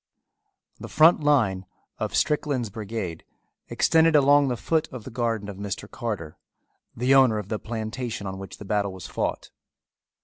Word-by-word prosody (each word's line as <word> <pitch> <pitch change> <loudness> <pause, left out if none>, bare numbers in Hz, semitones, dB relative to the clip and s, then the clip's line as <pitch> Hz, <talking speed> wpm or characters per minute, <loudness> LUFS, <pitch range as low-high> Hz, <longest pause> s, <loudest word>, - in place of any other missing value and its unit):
The - - -7
front 160 +3 +5
line 105 -11 +2 0.3
of - - -3
Strickland's 140 -7 0
brigade 105 -5 -5 0.4
extended 160 0 +3
along 145 0 +5
the 125 -2 -1
foot 160 +5 0
of 125 -4 -8
the - - -9
garden 115 -3 -2
of 100 -2 -7
Mr. 100 0 -5
Carter, 105 -11 -5 0.6
the 125 +3 +2
owner 130 -5 +5
of 105 -2 -6
the 110 - -2
plantation 115 -1 -5
on 95 0 -5
which 95 - -9
the 105 - -10
battle 100 -1 -1
was 95 - -9
fought. - - -3
115 Hz, 160 wpm, -25 LUFS, 100-135 Hz, 0.6 s, front